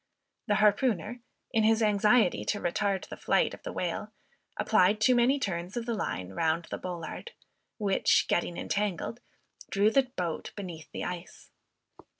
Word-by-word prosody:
The 205 - +3
harpooner, 215 +1 +2 0.3
in 225 -3 +2
his 225 +1 +4
anxiety 210 0 +3
to 205 - -1
retard 195 +2 -1
the - - -6
flight - - +2
of - - -10
the - - -6
whale, - - -3 0.5
applied 210 -1 +3
too 235 +4 +5
many 245 +3 +4
turns 190 -4 -3
of 235 - -2
the 235 - -1
line 95 - -3
round 165 - 0
the - - -3
bollard, 180 - -6 0.4
which, 200 -3 +2
getting 175 0 0
entangled, 210 +3 -2 0.5
drew 205 +2 +3
the 265 +1 +3
boat 170 -3 -3
beneath 175 -6 -8
the - - -5
ice. 180 0 -7
205 Hz, 155 wpm, -29 LUFS, 175-225 Hz, 0.5 s, too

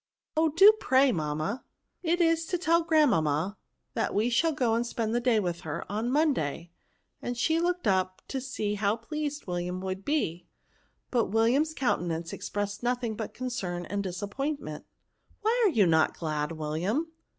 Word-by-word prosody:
Oh! 320 +1 +3
do 390 +8 +8
pray, 265 0 +4
mamma.*' 155 - -2 0.4
*^ - - 0
It 350 +1 +2
is 330 -1 +2
to 360 - 0
tell 335 -1 +3
grandmamma, 200 - +2 0.4
that - - -1
we 220 +4 +2
shall 325 +8 +3
go 245 -6 +1
and 230 +1 +2
spend 230 -2 -2
the 240 - +2
day 240 -2 +3
with 175 -4 -2
her, 165 -2 -5
on 220 +4 -1
Monday," 175 - 0 0.5
and 245 0 -4
she 320 +6 +2
looked 355 -1 0
up 185 -2 +1
to 265 - -3
see 215 -5 -2
how 205 0 +1
pleased 295 +5 -4
William 180 0 -3
wouldbe; 190 - -2 0.7
but 240 -3 +2
William's 250 +9 +2
countenance 170 -9 -1
expressed 205 0 -4
nothing 240 -2 -1
but 220 0 -6
concern 190 -9 -3
and 200 +3 -2
disappointment. 200 - -4 0.3
" - - -36
Why 460 +2 +3
are - - +4
you 225 - +4
not 160 -2 +3
glad, 155 -1 -2
William?" 175 - -2
225 Hz, 165 wpm, -28 LUFS, 180-290 Hz, 0.7 s, do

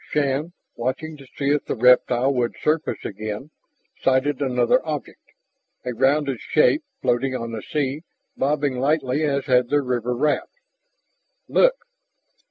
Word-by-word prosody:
Shann, 145 +3 0 0.2
watching 130 +6 -3
to 135 -2 -14
see 140 0 +1
if 150 - +1
the - - -2
reptile 125 +2 +4
would 120 -2 -1
surface 155 +1 -1
again, 105 +7 -5 0.5
sighted 135 +2 +1
another 125 -3 +2
object, 150 -3 -5 0.6
a 125 - -2
rounded 135 +1 +1
shape 300 - +3 0.2
floating 130 +2 +1
on 115 -2 -4
the 110 -2 -5
sea, 145 -2 -2 0.3
bobbing 140 -2 0
lightly 140 0 +1
as 140 -2 0
had 125 -2 +3
their 145 0 +2
river 125 -1 -1
raft. 150 +4 0 1.0
"Look!" - - +4
135 Hz, 135 wpm, -23 LUFS, 125-150 Hz, 1.0 s, reptile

